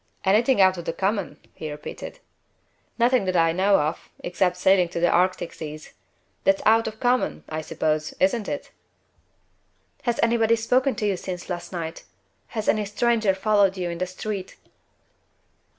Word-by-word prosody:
"Anything 220 +5 +3
out 190 -2 +5
of 170 - -8
the 165 - -2
common?" 195 +1 -1 0.2
he 155 - -6
repeated. 150 - -8 0.8
"Nothing 245 -2 +3
that 185 -1 -1
I 165 -1 +4
know 195 +4 +3
of, 150 +1 -3
except 180 0 0
sailing 185 -1 +4
for 170 0 -5
the 175 0 +3
Arctic 185 -1 +1
seas. 155 -1 -8 0.5
That's 290 -1 +2
out 225 +1 +4
of 220 - -5
the - - -28
common, 250 0 +1
I 155 0 -4
suppose 155 0 -2
isn't 205 +3 +1
it?" 290 - -5 1.3
"Has 240 -2 -1
anybody 230 -1 +3
spoken 255 +4 +1
to 220 - -2
you 200 -3 +1
since 180 0 -6
last 175 0 -5
night? 165 -2 -5 0.4
Has 220 -2 -5
any 215 -1 +2
stranger 215 -1 +1
followed 200 -1 +2
you 175 -2 -2
in 170 - -6
the 185 - -1
street?" 190 +1 -5
190 Hz, 165 wpm, -24 LUFS, 175-225 Hz, 1.3 s, out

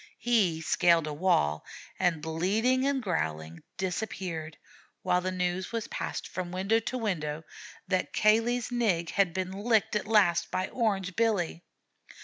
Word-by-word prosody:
He 210 -9 +2
scaled 170 0 +3
a 150 - -4
wall 145 - +1 0.4
and, 170 -4 +1
bleeding 215 +11 +1
and 275 -2 0
growling, 80 - -3 0.2
disappeared, 180 -4 -4 0.5
while 180 - +2
the 185 +1 -2
news 180 0 -2
was 230 -2 -3
passed - - -4
from 180 -1 -5
window 195 +5 +1
to 255 +3 -4
window 160 -9 -2 0.4
that 185 0 0
Cayley's 230 +3 +2
Nig 195 -9 0
had 195 -3 +2
been 185 +1 -3
licked 215 +2 +1
at 210 - -1
last 200 -6 +3
by 185 0 -2
Orange 195 -6 -1
Billy. 200 -7 0
185 Hz, 140 wpm, -29 LUFS, 170-220 Hz, 0.5 s, scaled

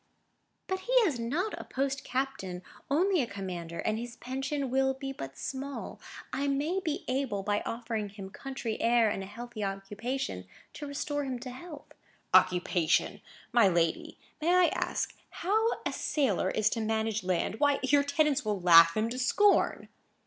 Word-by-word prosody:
"But 375 0 -2
he 485 +6 -4
is 290 -10 0
not 315 - -1
a - - -6
post 270 0 -2
captain, 250 -9 -3 0.3
only 355 +4 +3
a 245 - -1
commander, 180 -5 -6
and 215 +4 -1
his 235 0 -6
pension 270 +1 -3
will 265 0 +2
be 270 0 -5
but 135 - -8
small. 275 +1 -5 0.3
I 280 +1 0
may 295 +7 0
be 320 -6 -3
able, 255 -7 -1
by 205 +1 0
offering 225 -3 -3
him 195 -1 -9
country 265 -4 -5
air 230 -2 +4
and 195 - -3
a 190 - -6
healthy 235 +1 -7
occupation, 195 - -4 0.3
to 295 - -7
restore 290 +1 -2
him 260 -2 -3
to 255 -1 -6
health." 295 +3 -10 0.4
"Occupation! 180 -2 +3 0.3
My 235 -4 +6
lady, 170 -3 0 0.2
may 330 +3 +2
I 365 -1 +6
ask - - -2 0.2
how 430 +6 +1 0.2
a - - -1
sailor 240 - +1
is 215 +1 +1
to 230 - -1
manage 220 -1 0
land? 185 +4 -1
Why, 285 -1 +3
your 285 +2 +4
tenants 290 0 +1
will 210 -2 -1
laugh 165 -1 +7
him 215 +1 +2
to 255 - -4
scorn." 405 +11 +3
245 Hz, 165 wpm, -30 LUFS, 200-280 Hz, 0.4 s, laugh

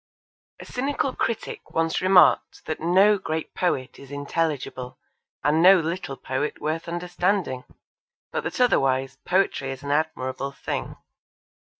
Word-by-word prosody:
A - - -9
cynical 270 +1 -2
critic 230 - -4
once 165 0 +1
remarked 185 0 +4
that 155 - -3
no 195 +5 +4
great 160 -3 -4
poet 135 -8 -1
is 140 - -12
intelligible 145 -3 -3 0.5
and 150 +2 +3
no 185 +2 +8
little 165 -4 -3
poet 130 +3 -3
worth 160 +2 -3
understanding, 175 -4 -1 0.7
but - - -2
that - - -4
otherwise 135 - +2
poetry 180 -7 +1
is 135 +1 -6
an 140 - -3
admirable 140 -3 -1
thing. - - -4
160 Hz, 125 wpm, -25 LUFS, 135-185 Hz, 0.7 s, no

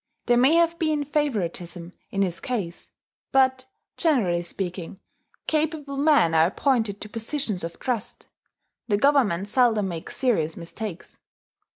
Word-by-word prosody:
There 240 - +4
may 260 +6 +5
have 335 0 +3
been 310 -2 +1
favouritism 185 - -2 0.2
in 195 0 0
his 175 -3 -2
case; 195 -7 -4 0.4
but, 260 -1 +3 0.3
generally 220 - +2
speaking, 180 +1 -5 0.5
capable 305 -2 -1
men 280 - +4
are 160 0 +5
appointed 220 -1 0
to - - -6
positions 225 - -2
of 165 0 -5
trust: 245 -6 -4 0.6
the 205 -3 +2
Government 215 -8 +3
seldom 225 -3 +3
makes 165 -2 -6
serious 185 - +1
mistakes. 180 +2 -7
220 Hz, 130 wpm, -25 LUFS, 175-280 Hz, 0.6 s, may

